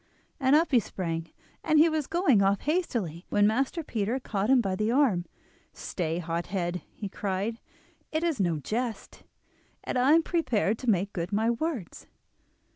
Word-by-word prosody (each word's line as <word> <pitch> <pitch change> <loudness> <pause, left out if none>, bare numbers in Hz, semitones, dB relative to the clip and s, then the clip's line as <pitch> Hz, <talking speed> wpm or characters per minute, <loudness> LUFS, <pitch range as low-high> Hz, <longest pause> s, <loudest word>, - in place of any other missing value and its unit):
And 265 0 +4
up 325 +2 +3
he 250 - +6
sprang, 165 -6 -4 0.3
and 310 - +3
was 310 -3 -1
going 340 - +3
off 195 +1 +2
hastily, 235 - -2
when 205 0 +3
Master 270 +9 0
Peter 230 -1 -2
caught 210 -3 -2
him 265 -1 +6
by 195 -5 0
the 215 +3 0
arm. 240 -10 +2 0.5
"Stay, 165 -2 -3
hothead!" 175 +1 -2
he 205 - -6
cried; 200 +3 -3 0.5
"it 315 +1 -1
is 330 -8 0
no 175 -4 +1
jest, 225 - -4 0.6
and 255 - -1
I 265 +4 +5
am 330 0 +5
prepared 230 - 0
to 250 - -2
make 200 0 +1
good 175 +1 -3
my 220 +3 +2
words." 245 - -4
220 Hz, 160 wpm, -28 LUFS, 185-270 Hz, 0.6 s, he